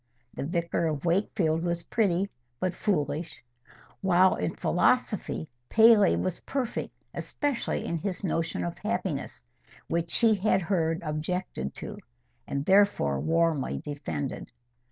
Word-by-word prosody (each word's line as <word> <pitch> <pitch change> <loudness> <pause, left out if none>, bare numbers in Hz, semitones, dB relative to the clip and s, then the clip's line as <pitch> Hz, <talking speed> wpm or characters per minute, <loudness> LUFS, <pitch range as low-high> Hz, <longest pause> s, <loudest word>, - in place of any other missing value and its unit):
The - - -4
"Vicar 170 0 0
of 150 -1 -3
Wakefield" 170 -2 +1
was 170 0 -1
pretty, 195 -3 +1 0.3
but 185 -1 0
foolish; 160 -6 -2 0.6
while 185 0 +5
in 90 - -2
philosophy, 80 - +1 0.2
Paley 220 -2 +6
was 185 -2 -2
perfect, 265 -4 -3 0.2
especially 290 -4 -2
in 170 - -2
his 195 +2 -4
notion 165 - -1
of 85 - -4
happiness, - - -3 0.4
which 170 0 0
she 225 +4 +4
had 195 -2 +2
heard 165 -2 0
objected 155 - -3
to, - - -7 0.5
and 140 0 -2
therefore 190 - +4
warmly 165 -4 +1
defended. 140 - -5
170 Hz, 120 wpm, -28 LUFS, 155-195 Hz, 0.6 s, Paley